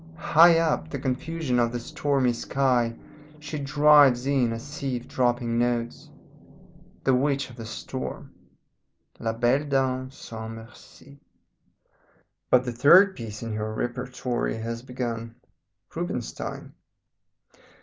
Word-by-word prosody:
High 165 0 +6
up 160 -1 0
the 140 - -4
confusion 135 0 -2
of 120 -1 +2
the 120 - -3
stormy 140 -1 0
sky 120 -2 0 0.4
she 150 0 -6
drives 140 -2 +5
in 135 -4 +2
a 115 - -4
sieve 135 -2 -5
dropping 120 -2 0
notes 120 -1 -2 0.9
the 135 - +3
witch 135 0 0
of - - -13
the 115 -2 -8
storm. 130 +2 -6 0.9
La 115 - -1
Belle 120 +5 +1
Dame 130 -2 0
Sans 115 -4 -8
Merci. 120 +5 -15 1.3
"But 125 0 +4
the 125 - -2
third 185 - +6
piece 110 -2 -7
in 115 -1 -4
her 110 0 -3
repertory 125 -1 -3
has 115 +1 -5
begun 120 -2 -5 0.6
Rubinstein. - - -5
125 Hz, 120 wpm, -25 LUFS, 120-140 Hz, 1.3 s, High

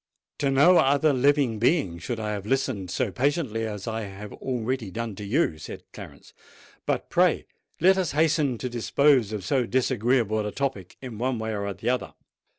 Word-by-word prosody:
"To 140 - +1
no 145 +7 +6
other 140 +2 +3
living 135 -3 +2
being 120 - +1
should 115 +7 -4
I 105 -1 -2
have 100 -1 -5
listened 130 -7 -1
so 120 +2 -1
patiently 125 - 0
as 105 -1 -6
I 110 0 -2
have 100 0 -8
already 125 -3 -3
done 115 +3 -4
to 105 - -6
you," 100 - 0
said - - -8
Clarence. - - -12 0.5
"But - - -1
pray - - +3 0.3
let 190 +3 +5
us 180 -6 -1
hasten 150 -4 +2
to 125 - -4
dispose 125 0 +2
of 105 -4 -4
so 130 -5 +1
disagreeable 120 -3 +1
a 105 - -3
topic 125 -10 -4
in 120 -4 -7
one 125 0 0
way 110 0 -3
or 100 0 -3
the 100 - -3
other." 125 -1 -2
120 Hz, 180 wpm, -26 LUFS, 105-140 Hz, 0.5 s, no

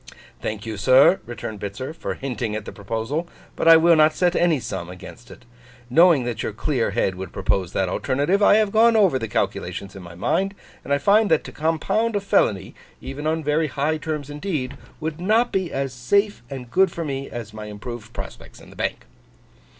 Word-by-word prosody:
'Thank 105 -1 -4
you, 110 -2 -5
sir,' 130 - +5
returned 110 -3 -6
Bitzer, 110 +9 -5
'for - - -4
hinting 120 -5 -3
at 110 -1 -5
the - - -7
proposal; 115 - -3 0.3
but - - -1
I 165 0 +10
will 165 +1 +5
not 155 0 +4
set 180 -1 +2
any 170 -4 +3
sum 85 -7 -5
against 90 +6 -11
it. - - -14 0.5
Knowing 165 -2 +6
that 120 -2 -3
your - - -3
clear 125 +1 -1
head 100 -2 0
would 95 +1 -7
propose 95 -3 -1
that 95 - 0
alternative, 145 - 0
I 205 - +6
have 215 -2 +2
gone 225 +2 +5
over 190 -11 +4
the 115 - -3
calculations 100 -1 -3
in 95 - -9
my 85 -1 -11
mind; 195 - 0 0.3
and - - -8
I 140 - +4
find 200 +8 +3
that 160 - +3
to - - -9
compound 165 +9 0
a - - +2
felony, 100 - +1 0.3
even 140 +3 -5
on 160 0 0
very 150 +2 +1
high 150 +3 -1
terms 150 -2 -4
indeed, 145 -4 -3 0.2
would 155 +1 -4
not 225 +6 +2
be 190 -3 -1
as 135 -1 -2
safe 200 - +1
and 125 -3 -8
good 190 -1 +4
for 170 -1 -4
me 135 -1 -4
as 115 -3 -7
my 110 -1 -7
improved 110 +2 -8
prospects - - -9
in - - -15
the - - -15
Bank. - - -3
140 Hz, 205 wpm, -23 LUFS, 115-170 Hz, 0.5 s, I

